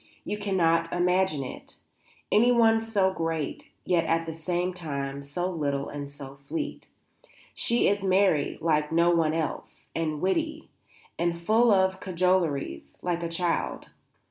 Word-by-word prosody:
You - - -2
cannot 165 -5 +1
imagine 180 -4 +1
it, 130 - -9 0.6
anyone 225 0 +5
so 200 -4 +1
great, 165 -4 -3 0.2
yet 175 -2 +2
at 165 0 +1
the 160 - -5
same 175 +3 -2
time 140 -5 -4
so 145 +6 -3
little 145 -6 -2
and 145 -1 -6
so 140 -1 -10
sweet. 140 +3 -5 0.7
She 235 +1 +1
is 200 0 +1
merry 190 -6 +2
like 150 -2 +1
no 170 +1 +4
one 165 -2 +2
else, 160 -2 -4
and 155 -2 -2
witty, 310 - -1 0.5
and 170 0 0
full 220 +7 +3
of 190 -1 +3
cajoleries, 170 - 0
like 175 -1 -1
a 170 - -2
child. 170 +1 -2
170 Hz, 140 wpm, -27 LUFS, 155-190 Hz, 0.7 s, anyone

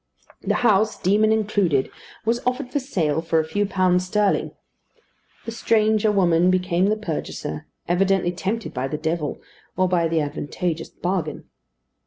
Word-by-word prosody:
The - - 0
house, 215 0 +3
demon 210 +4 +3
included, 205 -10 +1 0.3
was 230 +2 +1
offered 250 +1 -2
for 290 - 0
sale 160 - -1
for 165 -1 +1
a 160 - 0
few 205 +6 -1
pounds 185 -2 +2
sterling. 205 +1 +1 1.0
The 230 - -4
stranger 220 -1 +2
woman 180 -3 +3
became 180 0 +2
the 215 +1 +1
purchaser, 155 - -5 0.2
evidently 185 0 +2
tempted 200 +5 -3
by 130 0 -2
the 150 - -3
devil, 160 -1 -2 0.4
or 185 0 +3
by 175 -2 +2
the 165 0 +1
advantageous 160 +3 -3
bargain. 175 -4 -3
185 Hz, 145 wpm, -23 LUFS, 165-210 Hz, 1.0 s, house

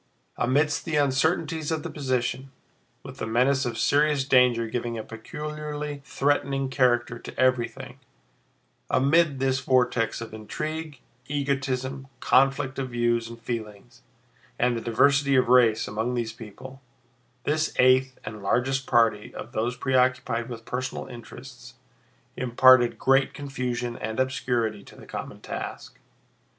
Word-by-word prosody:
Amid 140 +5 +2
the 160 - -4
uncertainties 150 +2 +1
of 160 -2 -2
the - - -4
position, 130 -1 -2 0.5
with - - -10
the - - -4
menace 130 +4 +2
of 115 -2 -4
serious 145 -1 +2
danger 125 -3 +4
giving 120 0 -3
a 110 - -4
peculiarly 150 +5 -6
threatening 135 -1 0
character 120 -2 +2
to - - -10
everything, 130 -2 0 0.9
amid 145 +2 +3
this 135 0 +1
vortex 125 -4 +1
of 115 -1 -8
intrigue, 155 +6 -5 0.3
egotism, 135 -2 -2
conflict 135 +1 +2
of 130 -1 -3
views 120 -1 0
and 115 0 -10
feelings, 115 0 -6 0.6
and 125 0 +2
the 115 - -3
diversity 140 +4 +3
of 130 -2 +3
race 120 -3 +4
among 115 +4 -2
these 115 -2 -2
people—this 125 +4 -6
eighth 130 +1 +4
and 110 -1 -7
largest 130 +6 0
party 115 -3 +2
of 120 - -8
those 120 +3 -2
preoccupied 130 -2 +1
with 115 -2 -8
personal 130 +1 -4
interests 120 -2 -11 0.6
imparted 130 0 +5
great 135 0 +2
confusion 125 -4 -3
and 110 +3 -4
obscurity 120 -5 -1
to - - -15
the - - -13
common - - -7
task. - - -7
130 Hz, 130 wpm, -26 LUFS, 120-135 Hz, 0.9 s, imparted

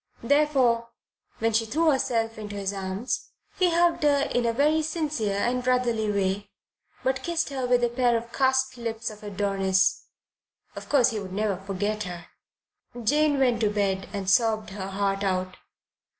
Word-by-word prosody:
Therefore, 255 -4 +2 0.5
when 225 0 0
she 225 +1 +2
threw 315 +7 +2
herself 225 -4 -1
into 205 -1 -6
his 200 0 -2
arms, 195 +4 -3 0.3
he 365 -1 +4
hugged 340 0 +2
her 285 -2 +3
in 245 -1 +1
a - - +2
very 300 +6 +2
sincere 300 - -2
and 245 +4 0
brotherly 240 -4 +1
way, 200 0 -1 0.5
but 260 0 0
kissed 335 -3 -1
her 265 -3 -3
with 245 0 +3
a 240 - +3
pair 240 -1 +2
of 235 +1 -8
cast 265 -1 +1
lips 230 -1 -4
of 210 - -13
Adonis. 195 -2 +1 0.7
Of - - -9
course 260 -4 +4
he 220 - -3
would 190 -2 -7
never 205 -1 0
forget 200 +2 -3
her. 175 -2 -7 0.8
Jane 295 +4 +3
went 245 -4 +2
to 215 - +3
bed 195 -2 -1
and 200 -2 -4
sobbed 215 0 +2
her 190 -1 -5
heart 195 0 -1
out. 185 -1 -1
225 Hz, 165 wpm, -26 LUFS, 200-260 Hz, 0.8 s, he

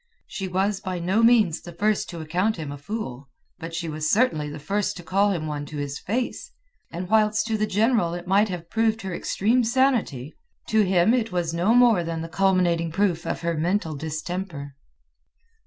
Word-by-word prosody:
She 195 -5 -5
was 190 +2 0
by 185 -1 -4
no 185 +6 +1
means 225 -8 +4
the 175 - -10
first 210 +4 0
to 170 -2 -6
account 180 +7 0
him 155 -3 -5
a 145 - -6
fool, 140 - -6 0.3
but 165 0 -6
she 165 0 -3
was 155 0 -2
certainly 200 -11 +2
the 150 - -7
first 200 +6 -2
to 175 - -9
call 200 +4 +2
him 170 -5 -2
one 150 -1 -3
to 150 - -7
his 145 0 -4
face; 250 - -3 0.4
and 175 +2 -5
whilst 215 +1 +3
to 225 -1 -1
the 215 0 0
general 210 -4 +2
it 175 - -7
might 200 +3 +3
have 175 -2 -5
proved 225 -1 +1
her 190 -2 -4
extreme 230 +8 +1
sanity, 230 - +1 0.4
to 220 -1 +4
him 190 +2 +3
it 230 -4 0
was 175 -2 -1
no 180 +8 +2
more 235 -7 +5
than 165 -1 -4
the 165 - -7
culminating 175 -2 +2
proof 175 -2 0
of - - -3
her 170 0 0
mental 165 0 -1
distemper. 155 0 -5
185 Hz, 195 wpm, -24 LUFS, 165-215 Hz, 0.4 s, more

